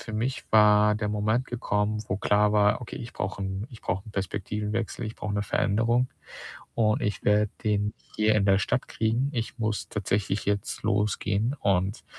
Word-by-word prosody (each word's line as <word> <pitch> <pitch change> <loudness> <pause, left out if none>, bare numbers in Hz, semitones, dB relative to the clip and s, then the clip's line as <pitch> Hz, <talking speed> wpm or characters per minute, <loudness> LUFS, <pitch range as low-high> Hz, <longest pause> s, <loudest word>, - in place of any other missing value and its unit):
für 110 - -8
mich 120 +5 -2
war 105 -1 +6
der 105 0 -2
Moment 105 +4 0
gekommen, 105 -3 -1
wo 95 - 0
klar 105 +1 +3
war: 105 0 +3
„Okay, 125 - -8
ich 120 - -7
brauche 100 +1 -4
'n 95 +2 -3
ich 115 - -12
brauche 95 +3 -2
'n 105 - -11
Perspektivenwechsel, 105 +4 -3
ich 110 - -7
brauche 105 -1 -3
'ne 100 - 0
Veränderung 115 +5 +1 0.7
und 110 -2 +2
ich 105 - -2
werde 105 0 +3
den 105 -2 +1
nicht - - -30
hier 110 0 +3
in 105 - +3
der 95 -1 +5
Stadt 125 +4 -1
kriegen, 115 +5 0
ich 115 +1 -3
muss 110 -2 -2
tatsächlich 100 -1 -1
jetzt 100 -1 -1
losgehen.“ 105 +3 0
Und 95 +1 0
105 Hz, 180 wpm, -27 LUFS, 100-110 Hz, 0.7 s, war